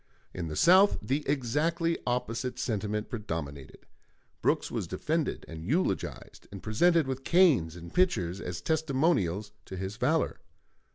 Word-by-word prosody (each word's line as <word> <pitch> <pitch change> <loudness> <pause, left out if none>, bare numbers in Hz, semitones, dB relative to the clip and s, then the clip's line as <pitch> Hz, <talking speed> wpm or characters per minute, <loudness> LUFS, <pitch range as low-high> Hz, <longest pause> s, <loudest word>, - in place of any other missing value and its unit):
In 85 -2 -4
the 75 - -5
South 190 - +6
the 140 +3 -1
exactly 155 +6 +1
opposite 125 0 -2
sentiment 105 -4 -2
predominated. 80 - -6 0.6
Brooks - - +1
was - - -3
defended 160 -2 -2
and 80 -1 -8
eulogized, 155 - -2
and 100 -2 -9
presented 165 +9 +3
with 130 0 -4
canes 140 - +4
and 85 0 -10
pitchers 100 - +1
as 90 0 -5
testimonials 135 - +1
to 95 - -7
his 95 +3 -5
valor. - - +1
120 Hz, 130 wpm, -29 LUFS, -, 0.6 s, South